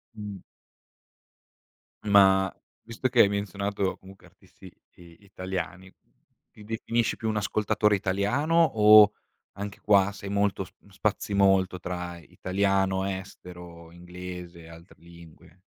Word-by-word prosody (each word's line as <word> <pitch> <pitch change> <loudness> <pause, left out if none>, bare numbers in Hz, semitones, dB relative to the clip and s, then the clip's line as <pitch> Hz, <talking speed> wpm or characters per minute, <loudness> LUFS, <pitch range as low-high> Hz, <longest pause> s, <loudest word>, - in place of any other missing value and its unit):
Mh. 105 -2 -7 1.6
Ma 95 -2 +4 0.3
visto 115 +3 -3
che 120 -2 +5
hai - - +6
menzionato, 100 -1 -3
comunque, 95 +1 -16
artisti, - - -17 0.3
i 85 -1 -16
italiani, 95 -1 -6 0.6
ti 105 - -15
definisci 115 +2 -2
più 110 - -4
un 110 -1 -1
ascoltatore 105 0 +1
italiano 105 - -1
o, 105 -6 +7 0.4
anche 100 0 -7
qua, 100 -1 +3
sei 100 0 -9
molto 100 -1 0
sp 95 - -17
spazi 100 +1 -2
molto 95 -2 +2
tra 90 -1 -6
italiano, 95 +3 -1
estero, 90 -3 -9
inglese 90 0 -10
e 80 - -14
altre 85 +2 -15
lingue? 85 0 -17
95 Hz, 120 wpm, -26 LUFS, 90-105 Hz, 1.6 s, o